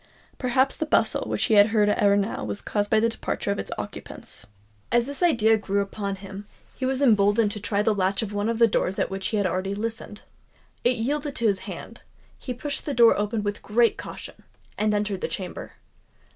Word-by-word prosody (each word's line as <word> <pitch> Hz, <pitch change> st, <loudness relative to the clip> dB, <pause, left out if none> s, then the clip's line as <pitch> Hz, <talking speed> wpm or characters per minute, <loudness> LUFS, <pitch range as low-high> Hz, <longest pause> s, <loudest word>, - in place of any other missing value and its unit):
Perhaps 260 Hz, +1 st, +2 dB
the 315 Hz, -, -2 dB
bustle -, -, +2 dB
which -, -, 0 dB
he 225 Hz, -, +2 dB
had 205 Hz, 0 st, +7 dB
heard 215 Hz, -2 st, +2 dB
ere 205 Hz, -1 st, +3 dB
now 205 Hz, +2 st, -1 dB
was 100 Hz, -1 st, -3 dB
caused 205 Hz, -1 st, -1 dB
by 220 Hz, -, +4 dB
the 230 Hz, -, +3 dB
departure 225 Hz, -2 st, -3 dB
of 200 Hz, -, -2 dB
its -, -, -5 dB
occupants? 100 Hz, -, -7 dB, 0.4 s
As 240 Hz, 0 st, +3 dB
this 285 Hz, +4 st, -4 dB
idea 225 Hz, -10 st, +4 dB
grew 200 Hz, -1 st, -1 dB
upon 200 Hz, 0 st, -3 dB
him, 195 Hz, +1 st, -9 dB, 0.3 s
he 260 Hz, -, -2 dB
was 265 Hz, +1 st, +1 dB
emboldened 210 Hz, -2 st, +4 dB
to 210 Hz, -, -3 dB
try 205 Hz, 0 st, 0 dB
the 220 Hz, 0 st, +3 dB
latch 195 Hz, +1 st, 0 dB
of 210 Hz, -1 st, -5 dB
one 205 Hz, +2 st, -1 dB
of 230 Hz, -, -1 dB
the 230 Hz, -, +6 dB
doors 195 Hz, -3 st, 0 dB
at -, -, -1 dB
which 195 Hz, 0 st, -2 dB
he 215 Hz, -, -1 dB
had 200 Hz, -, +1 dB
already 185 Hz, +2 st, -1 dB
listened. 220 Hz, -1 st, -4 dB, 0.6 s
It 245 Hz, +1 st, +3 dB
yielded 285 Hz, +5 st, -2 dB
to 235 Hz, -, +1 dB
his 200 Hz, -3 st, +1 dB
hand; -, -, -8 dB, 0.4 s
he 255 Hz, -, -6 dB
pushed 280 Hz, +5 st, -4 dB
the 285 Hz, -, -1 dB
door 235 Hz, -1 st, +6 dB
open 210 Hz, +1 st, -1 dB
with 205 Hz, 0 st, -3 dB
great 230 Hz, +2 st, +2 dB
caution, -, -, -9 dB, 0.3 s
and 215 Hz, 0 st, +1 dB
entered 205 Hz, -2 st, -1 dB
the -, -, -1 dB
chamber. 185 Hz, -2 st, -6 dB
210 Hz, 215 wpm, -25 LUFS, 200-235 Hz, 0.6 s, had